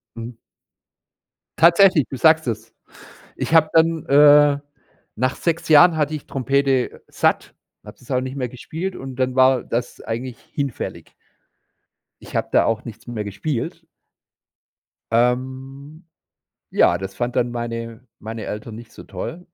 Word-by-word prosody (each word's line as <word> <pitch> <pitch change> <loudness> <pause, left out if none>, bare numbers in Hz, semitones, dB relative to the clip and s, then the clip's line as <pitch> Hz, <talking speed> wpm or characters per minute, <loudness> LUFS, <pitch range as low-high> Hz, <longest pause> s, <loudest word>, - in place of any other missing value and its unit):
Mhm. 115 +1 -8 1.2
Tatsächlich, 170 -2 +5
du 135 - -6
sagst 160 -1 +4
es. 115 0 -5 0.6
Ich - - -3
habe 155 -1 +5
dann, 165 -1 +2
äh, 145 0 +6 0.6
nach 130 +4 0
6 165 -1 -2
Jahren 160 +3 +7
hatte 150 0 0
ich 150 - -9
Trompete 135 -1 0
satt, - - -1 0.3
habe - - -12
das 125 - -13
auch 125 -1 +1
nicht 130 +1 -6
mehr 125 -3 -2
gespielt 165 +9 -6
und 135 -1 -8
dann 130 -1 -1
war 130 -1 +4
das 120 +1 -4
eigentlich 120 +2 -5
hinfällig. 140 -4 -5 1.1
Ich - - -12
habe - - 0
da - - +4
auch 115 +1 -1
nichts 115 0 -11
mehr 115 -3 -4
gespielt. 115 +5 -4 1.3
Ähm, 130 +6 -2 0.7
ja, 85 - +3
das 95 +1 -7
fand 120 +1 -3
dann 120 -1 +1
meine 115 0 -6 0.2
meine 110 +1 -6
Eltern 105 +1 -6
nicht 115 0 -12
so - - -12
toll, 175 +2 -7
130 Hz, 140 wpm, -21 LUFS, 115-150 Hz, 1.3 s, Jahren